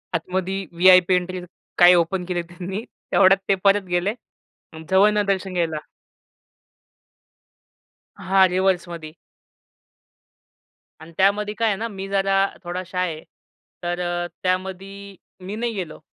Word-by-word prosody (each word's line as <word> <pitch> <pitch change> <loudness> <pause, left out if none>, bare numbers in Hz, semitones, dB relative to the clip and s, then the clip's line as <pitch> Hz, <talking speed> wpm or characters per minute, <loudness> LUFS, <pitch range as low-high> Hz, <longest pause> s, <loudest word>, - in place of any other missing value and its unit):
आतमध्ये 190 +3 -2
VIP 185 0 +6
entry 180 0 -2 0.4
काय 180 0 +8
open 175 +2 0
केले 175 -1 -2
त्यांनी, 180 +5 -7 0.3
तेवढ्यात 195 0 +5
ते 195 - +4
परत 200 0 +4
गेले 175 +4 0 0.8
जवळनं 205 +2 +4
दर्शन 190 -1 -1
घ्यायला. 165 -3 -1 2.4
हां 190 0 +4
रिवर्समध्ये. 175 -4 -1 1.9
आणि 160 +1 -13
त्यामध्ये 205 +2 +2
काय 225 - +2
आहे 205 - +1
ना 230 +2 -3
मी 195 -2 -7
जरा 195 0 +2 0.2
थोडा 180 +1 -4
शाय 180 -2 -2
आहे. 155 - -11 0.6
तर 175 +1 -2
अ, 175 0 -2 0.2
त्यामध्ये 190 +2 -4 0.3
मी 200 +3 -5
नाही 235 0 -2
गेलो 180 -6 -6
185 Hz, 120 wpm, -22 LUFS, 175-195 Hz, 2.4 s, काय